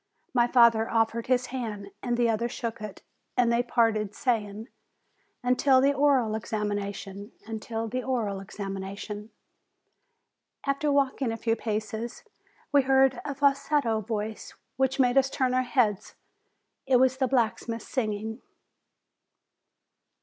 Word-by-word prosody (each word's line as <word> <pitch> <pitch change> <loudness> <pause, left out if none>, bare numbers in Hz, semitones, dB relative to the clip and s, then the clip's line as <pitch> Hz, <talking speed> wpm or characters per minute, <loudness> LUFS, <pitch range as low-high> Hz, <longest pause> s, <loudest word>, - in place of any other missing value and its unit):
My 240 -2 +4
father 235 -2 +5
offered 225 0 +1
his 255 0 +2
hand, 210 -6 -5
and 240 -1 -1
the 240 -1 +3
other 230 +1 0
shook 230 -2 -5
it; 210 -2 -8 0.3
and 240 -1 +4
they 235 - +3
parted, 225 -4 +1
saying, 220 -4 -1 0.8
"Until 260 +2 +4
the 275 +2 +4
oral 275 -6 +3
examination." 205 -1 -4
"Until 225 +1 -4
the 255 +3 -2
oral 230 -7 -1
examination." 200 +1 -6 1.4
After 280 +1 +1
walking 275 -3 +1
a 225 - -3
few 225 0 0
paces, 220 +1 -4 0.5
we 285 -1 +6
heard 265 -1 +3
a 280 - -4
falsetto 275 -4 +2
voice 215 0 -5 0.2
which 265 +1 0
made 250 +1 +5
us 270 0 +1
turn 260 -2 0
our 255 - +3
heads. 225 -6 0 0.7
It 260 - +4
was 260 0 +3
the 265 -1 +1
black 240 -4 +1
smith 230 -1 -5
singing. 220 -1 -3
235 Hz, 130 wpm, -27 LUFS, 215-260 Hz, 1.4 s, we